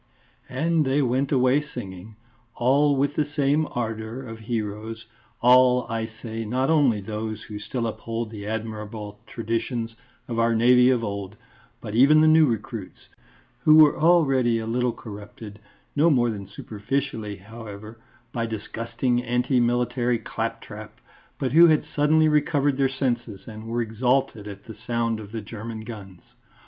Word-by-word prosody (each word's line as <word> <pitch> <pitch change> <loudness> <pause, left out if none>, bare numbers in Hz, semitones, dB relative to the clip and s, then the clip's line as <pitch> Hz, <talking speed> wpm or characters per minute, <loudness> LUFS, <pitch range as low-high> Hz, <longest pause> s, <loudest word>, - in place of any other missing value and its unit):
And 160 +5 +1
they 140 +1 +1
went 130 +2 0
away 130 +1 +3
singing, 105 -8 -9 0.4
all 140 +4 +3
with 140 +1 +1
the 150 - +1
same 145 +2 +2
ardour 115 +1 -4
of 115 -3 -8
heroes; 110 0 -4 0.4
all, 125 0 +5
I 115 -1 -2 0.2
say, 115 -1 -4
not 130 +6 0
only 135 -10 +3
those 110 +1 -5
who 105 -1 -8
still 115 +3 -3
uphold 115 0 -4
the 105 -2 -7
admirable 105 -1 -5
traditions 115 0 -3 0.3
of 115 -1 -3
our 115 0 +3
Navy 125 +2 +5
of 125 -3 +2
old, 100 -1 -5 0.5
but 105 - -7
even 140 +7 +6
the 155 - +5
new 155 0 +6
recruits, 115 -3 -5 0.5
who 155 +5 +5
were 155 -2 +7
already 135 -8 +3
a 110 - -3
little 125 +2 0
corrupted 105 -1 -10 0.4
no 155 +3 +4
more 120 -6 +3
than 100 -3 -7
superficially, 110 +2 -4
however 110 +1 -10 0.3
by 115 -1 -1
disgusting, 115 +3 -2
anti 125 +2 +1
military 120 0 +1
claptrap, 110 -1 -6 0.4
but 130 -3 -2
who 170 +4 +8
had 155 -2 +3
suddenly 155 +2 +3
recovered 145 -2 +2
their 135 -1 +2
senses 120 -6 -3
and 110 -1 -9
were 120 +1 -1
exalted 120 -1 0
at 100 -1 -9
the 110 - -9
sound 115 -1 -2
of 105 -2 -10
the 115 -1 -4
German 110 +1 -7
guns. 100 -6 -10
115 Hz, 150 wpm, -24 LUFS, 110-130 Hz, 0.5 s, who